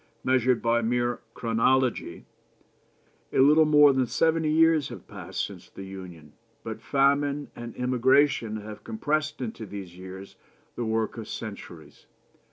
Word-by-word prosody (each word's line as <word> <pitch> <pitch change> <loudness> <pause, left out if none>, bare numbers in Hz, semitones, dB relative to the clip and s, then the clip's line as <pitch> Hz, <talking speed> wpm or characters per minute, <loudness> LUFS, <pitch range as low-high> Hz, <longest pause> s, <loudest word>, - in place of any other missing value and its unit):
Measured 130 -1 +2
by 115 0 +2
mere 120 +1 0 0.2
chronology, 120 +2 0 1.1
a - - -2
little 150 +4 +6
more 150 -2 +6
than 130 -2 +1
seventy 160 +3 +1
years 160 -2 +3
have - - -10
passed - - -4
since - - -11
the 95 - -10
Union, 90 -6 -10 0.3
but 110 -1 -6
famine 140 +2 +1
and 120 -1 -8
emigration 125 -2 +2
have 105 0 -10
compressed 150 +7 -2
into 115 -2 -5
these 100 -4 -8
years 95 +1 -10 0.4
the 120 - -3
work 110 +1 -1
of 110 - -7
centuries. 100 -7 -9
120 Hz, 135 wpm, -26 LUFS, 110-140 Hz, 1.1 s, little